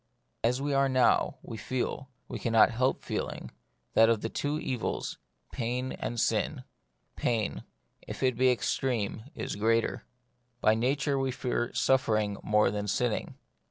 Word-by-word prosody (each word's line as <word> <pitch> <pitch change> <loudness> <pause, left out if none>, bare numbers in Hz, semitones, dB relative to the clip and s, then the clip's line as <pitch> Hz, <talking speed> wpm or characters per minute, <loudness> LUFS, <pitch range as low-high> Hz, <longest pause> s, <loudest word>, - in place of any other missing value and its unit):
As 120 +3 +2
we 140 +1 -1
are 135 0 +3
now, 130 -1 +3
we 115 - -7
feel, 130 +3 -3 0.2
and - - -6
can 115 - -1
not 110 - +6
help 130 +3 0
feeling, - - -4 0.4
that 115 0 +6
of 115 -2 +2
the 115 - -2
two 145 +5 -2
evils, 125 -6 -3 0.3
pain 125 +2 -2
and 120 - -4
sin, - - 0 0.5
pain, 115 -4 -1 0.4
if - - -5
it 130 -2 +3
be 130 +2 +4
extreme, 115 -3 -1
is - - -4
the 100 - -7
greater. 115 +1 +1 0.6
By 110 - +4
nature 135 +4 +1
we 135 0 0
fear 125 -1 -2
suffering 110 -6 +2
more 105 -1 +3
than 105 0 -3
sinning. 110 +3 -1
120 Hz, 155 wpm, -29 LUFS, 110-130 Hz, 0.6 s, not